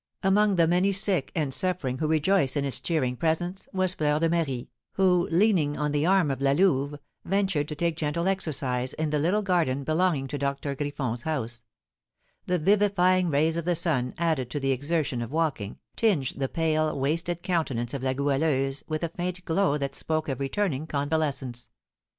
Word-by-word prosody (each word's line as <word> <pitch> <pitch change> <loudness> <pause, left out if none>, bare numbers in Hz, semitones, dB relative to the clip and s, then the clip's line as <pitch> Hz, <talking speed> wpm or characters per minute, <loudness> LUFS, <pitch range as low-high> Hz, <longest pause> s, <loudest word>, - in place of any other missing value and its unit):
Among 200 +1 +3
the 170 -2 +4
many 180 +4 +2
sick 190 -6 +3
and 150 -5 0
suffering 135 -4 -1
who 155 - 0
rejoiced 155 -2 +2
in 140 - 0
its 135 - -1
cheering 130 -7 -1
presence 175 +6 -2
was 185 -1 +2
Fleur 150 -3 +1
de 165 +1 +1
Marie, 150 -8 -2 0.2
who, 180 -2 +3
leaning 170 -5 +2
on 150 +1 -1
the 150 +2 +1
arm 185 -6 +3
of 135 0 -4
La 135 0 +3
Louve, 145 -4 +2 0.3
ventured 190 -6 0
to 150 - -5
take 170 +1 -1
gentle 165 +3 -1
exercise 135 -9 -1
in 155 -1 -2
the 150 - +1
little 185 +8 +1
garden 165 -8 +1
belonging 155 -1 +1
to 145 - -4
Doctor 140 +1 -2
Griffon's 140 -4 -3
house; 120 -6 -3 0.8
the 180 - +1
vivifying 185 0 +3
rays 160 +3 +2
of 170 - -3
the 175 0 +1
sun, 145 -7 0
added 160 -7 0
to 145 - -3
the 135 -1 0
exertion 145 -1 -1
of 115 - -5
walking, 150 -10 -2 0.2
tinged 180 - +1
the 135 -1 -2
pale, 155 -2 0
wasted 170 +5 -1
countenance 145 -10 -1
of 140 - -3
La 130 0 0
Goualeuse 135 0 0
with 155 +1 -3
a 170 - -1
faint 180 +2 -4
glow 165 -3 +1
that 140 -2 -3
spoke 155 -1 -2
of 135 -2 -3
returning 155 0 -1
convalescence. 140 -5 -2
155 Hz, 180 wpm, -26 LUFS, 140-175 Hz, 0.8 s, the